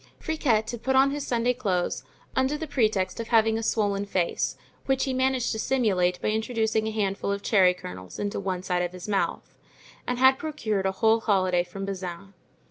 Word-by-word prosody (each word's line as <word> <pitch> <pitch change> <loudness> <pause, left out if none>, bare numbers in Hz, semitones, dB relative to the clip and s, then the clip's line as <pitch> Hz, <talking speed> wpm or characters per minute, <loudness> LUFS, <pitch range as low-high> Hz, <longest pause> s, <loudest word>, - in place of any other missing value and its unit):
Friquet 240 -9 0
had 240 -2 -7
put 265 +2 0
on 270 +1 +5
his 290 0 -4
Sunday 240 0 +1
clothes, 195 -8 -1 0.3
under 265 +3 +1
the 320 - -4
pretext 220 -9 0
of 230 - -4
having 225 -1 +4
a 225 - -1
swollen 205 -3 0
face 185 -3 -1 0.3
which 270 -1 +2
he 270 - -1
had 255 - -2
managed 260 -2 +1
to 220 - -3
simulate 190 -9 +1
by - - +1
introducing 220 0 0
a - - -1
handful 200 -2 -1
of 200 0 -3
cherry 185 -4 +4
kernels 90 - -9
into 205 0 -2
one 185 -2 -3
side 180 -1 0
of 175 0 -2
his 180 +1 -8
mouth, 200 -2 -1 0.5
and 250 - -1
had 260 +1 +5
procured 220 -11 -2
a - - +1
whole 220 +4 +3
holiday 185 -5 +2
from 195 +2 -7
Bazin. 190 0 -6
215 Hz, 200 wpm, -26 LUFS, 190-250 Hz, 0.5 s, on